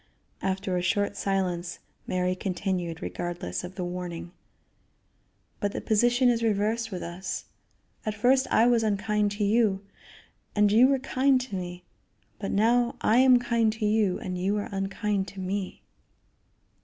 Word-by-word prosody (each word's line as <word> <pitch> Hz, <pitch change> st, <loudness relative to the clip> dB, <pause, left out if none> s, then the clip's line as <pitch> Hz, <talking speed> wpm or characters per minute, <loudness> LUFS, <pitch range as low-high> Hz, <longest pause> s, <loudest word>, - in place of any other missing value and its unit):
After 190 Hz, -1 st, -1 dB
a -, -, 0 dB
short 205 Hz, +3 st, 0 dB
silence 180 Hz, -3 st, -1 dB, 0.3 s
Mary 180 Hz, 0 st, 0 dB
continued, 185 Hz, -3 st, -3 dB
regardless 175 Hz, -, -4 dB
of 180 Hz, +1 st, -8 dB
the 185 Hz, -, -3 dB
warning: 175 Hz, -1 st, -5 dB, 1.3 s
"But 205 Hz, 0 st, -1 dB
the -, -, -3 dB
position 240 Hz, +4 st, +3 dB
is 235 Hz, -1 st, +3 dB
reversed 220 Hz, +1 st, 0 dB
with 185 Hz, -4 st, -5 dB
us; 185 Hz, +3 st, -5 dB, 0.6 s
at 215 Hz, -1 st, -2 dB
first 255 Hz, +5 st, +3 dB
I 225 Hz, -, +4 dB
was 240 Hz, -1 st, +4 dB
unkind 210 Hz, -1 st, +1 dB
to 205 Hz, +1 st, -2 dB
you, 205 Hz, -2 st, +2 dB, 0.7 s
and 210 Hz, -1 st, +4 dB
you 235 Hz, +4 st, +7 dB
were 275 Hz, 0 st, +3 dB
kind 265 Hz, 0 st, +2 dB
to 245 Hz, -6 st, -6 dB
me, 180 Hz, -1 st, -6 dB, 0.6 s
but 195 Hz, -, -3 dB
now 235 Hz, +4 st, +2 dB
I 220 Hz, -, +3 dB
am 255 Hz, -1 st, +7 dB
kind 235 Hz, -2 st, +1 dB
to 220 Hz, -1 st, -3 dB
you 210 Hz, -3 st, +2 dB
and 180 Hz, -1 st, -5 dB
you 195 Hz, +3 st, 0 dB
are 205 Hz, -, -3 dB
unkind 195 Hz, 0 st, -1 dB
to 200 Hz, -, -9 dB
me." 190 Hz, +1 st, -4 dB
205 Hz, 155 wpm, -27 LUFS, 185-225 Hz, 1.3 s, you